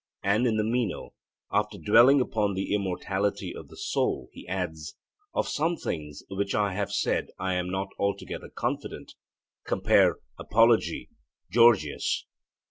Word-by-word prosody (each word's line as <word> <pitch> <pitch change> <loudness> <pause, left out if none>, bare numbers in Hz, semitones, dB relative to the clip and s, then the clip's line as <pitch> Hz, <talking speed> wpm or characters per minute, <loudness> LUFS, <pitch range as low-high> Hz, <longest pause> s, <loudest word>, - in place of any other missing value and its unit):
And 105 +5 +3
in 110 -2 +1
the 105 - +2
Meno, 115 -3 -2 0.4
after 105 0 0
dwelling 120 +7 +6
upon 105 -5 0
the 95 +1 -2
immortality 100 0 -1
of - - -9
the - - -15
soul, 65 - -1
he - - -12
adds, 80 -4 -4 0.4
'Of - - +1
some 165 +3 0
things 75 -3 -5
which 100 +1 -2
I 100 -2 +1
have 100 +1 -2
said - - 0
I 95 -1 -1
am 90 0 -1
not 95 +1 -2
altogether 100 0 -3
confident' - - -4 0.5
(compare - - +3 0.2
Apology; 115 +1 +3 0.4
Gorgias). 115 -10 +3
100 Hz, 135 wpm, -27 LUFS, 95-115 Hz, 0.5 s, dwelling